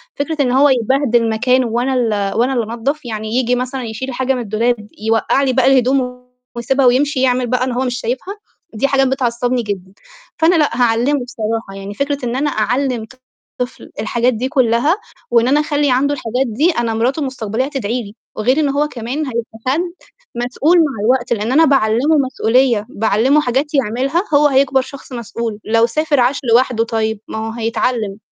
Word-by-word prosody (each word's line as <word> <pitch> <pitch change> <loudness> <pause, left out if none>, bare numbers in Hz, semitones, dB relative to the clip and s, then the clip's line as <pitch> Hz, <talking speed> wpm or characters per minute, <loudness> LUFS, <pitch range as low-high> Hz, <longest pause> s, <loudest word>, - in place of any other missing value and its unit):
فكرة 290 +1 -2
إن 250 - +1
هو 275 +3 +5
يبهدل 245 -2 +2
مكانُه 250 +3 +2
وأنا 240 +4 -1
ال 215 -6 0
وأنا 250 +3 +2
اللي 230 -2 -2
أنضَّف، 275 +5 -3
يعني 215 -2 -5
ييجي 250 -1 +2
مثلًا 255 +1 -3
يشيل 240 +3 -5
حاجة 260 +1 0
من 250 - -3
الدولاب، 220 0 -1 0.2
يوقّع 225 +5 +2
لي 260 -2 +1
باقي 260 +1 +4
الهدوم، 250 -1 0 0.3
ويسيبها 260 +3 +1
ويمشي، 260 +2 +2
يعمل 250 -1 +2
بقى 250 +1 0
إن 255 - -1
هو 250 +2 -1
مش 245 -1 -2
شايفها! 255 - -4 0.4
دي 225 +5 0
حاجات 270 -1 +2
بتعصّبني 245 -1 0
جدًا، 190 -3 -5 0.5
فأنا 330 +2 +4
لأ، 305 -3 +3
هاعلّمه 245 +5 +2
بصراحة، 225 -3 -4
يعني 195 +1 -7
فكرة 280 +3 -2
إن 240 0 -2
أنا 290 +3 0
أعلم 250 0 -1 0.5
طفل 250 0 -5
الحاجات 240 +2 +1
دي 245 +4 -2
كلّها، 260 - +2 0.3
وإن 235 0 +4
أنا 285 +3 +3
أخلِّي 295 -2 +1
عنده 275 +3 +2
الحاجات 255 -1 -2
دي، 280 +11 +2
أنا 240 -7 -1
مراتُه 245 +7 0
المستقبلية 260 -4 -2
هتدعي 250 -4 -3
لي، 205 0 -12 0.2
وغير 255 +7 +1
إن 295 -2 +2
هو 285 +2 +1
كمان 245 0 -5
هيبقى 230 -2 -5
حد 280 +6 +2 0.5
مسؤول 250 +8 +1
مع 320 -4 +3
الوقت، 245 0 +2
لإن 220 +1 -2
أنا 320 +5 +5
باعلمه 270 +2 +3
مسؤولية، 255 -4 +2
باعلمه 225 +7 +2
حاجات 270 +3 -1
يعملها، 270 - 0
هو 295 +1 +5
هيكبر 270 -1 +3
شخص 275 +1 -11
مسؤول، 235 -2 -5
لو 230 +1 +3
سافر، 300 +4 0
عاش 250 +3 +2
لوحدُه 240 -1 +3
طيب، 220 -1 -2
ما - - -6
هو - - -4
هيتعلم. 225 -2 -2
250 Hz, 180 wpm, -17 LUFS, 230-275 Hz, 0.5 s, هو